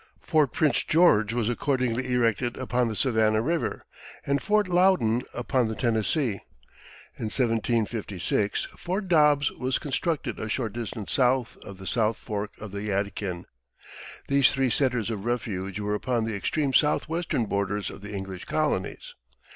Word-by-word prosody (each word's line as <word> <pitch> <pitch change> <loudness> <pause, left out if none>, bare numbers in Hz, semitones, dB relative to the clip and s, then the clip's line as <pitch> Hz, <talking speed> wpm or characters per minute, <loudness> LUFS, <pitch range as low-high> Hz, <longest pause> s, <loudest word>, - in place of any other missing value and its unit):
Fort 155 -6 +2
Prince 150 -6 +2
George 115 - +4
was 115 -2 0
accordingly 125 0 0
erected 120 0 +1
upon 125 -1 0
the 110 - -3
Savannah 110 -3 +2
River, 165 +5 -1 0.4
and 140 0 +1
Fort 210 -1 +2
Loudon 175 -11 +3
upon 125 0 0
the 110 - -3
Tennessee. 115 - 0 0.8
In - - -4
1756 110 -4 0
Fort 190 +3 -3
Dobbs 150 -4 +4
was 130 0 -1
constructed 145 -3 -2
a 110 - -4
short 110 -2 -2
distance 115 -2 -5
south 125 -2 +2
of 100 - -11
the 95 - -10
South 110 +3 +1
Fork 105 -2 -4
of 105 -2 -8
the 100 0 -5
Yadkin. 100 -3 -2 0.8
These 140 -1 +5
three 135 -2 +1
centers 120 -5 +1
of 105 -3 -4
refuge 105 -5 -3
were 105 0 -1
upon 115 +1 0
the 110 -2 -2
extreme 140 +7 -1
southwestern 155 -3 +1
borders 100 0 -2
of 95 - -11
the 105 +1 -8
English 95 -2 -6
colonies. - - -2
120 Hz, 145 wpm, -26 LUFS, 105-135 Hz, 0.8 s, These